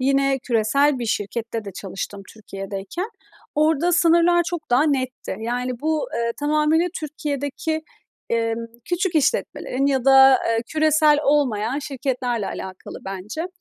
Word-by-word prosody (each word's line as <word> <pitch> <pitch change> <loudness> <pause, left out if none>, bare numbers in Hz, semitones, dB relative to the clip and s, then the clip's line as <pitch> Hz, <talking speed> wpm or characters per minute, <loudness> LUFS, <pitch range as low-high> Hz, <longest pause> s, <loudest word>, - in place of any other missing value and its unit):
yine 275 +1 +2
küresel 260 +4 +2
bir 235 - -3
şirkette 225 0 -3
de 200 - -7
çalıştım 195 +1 -6
Türkiye'deyken, 200 - -6 0.4
orada 315 +3 +2
sınırlar 345 +1 +4
çok 345 -6 -5
daha 250 +4 +4
netti. 260 -8 -2
Yani, 245 +1 -3
bu, 315 +8 -1
ııı, 235 0 0
tamamıyla 305 +3 +2
Türkiye'deki, 300 +1 -3 0.5
emm, 230 0 0 0.2
küçük 360 0 -1
işletmelerin 280 - 0
ya 265 -3 +1
da 270 -1 +7 0.3
küresel 310 -1 +4
olmayan 260 -4 +1
şirketlerle 255 -6 -2
alakalı 185 -1 -7
bence. 195 - -5
270 Hz, 120 wpm, -22 LUFS, 230-305 Hz, 0.5 s, da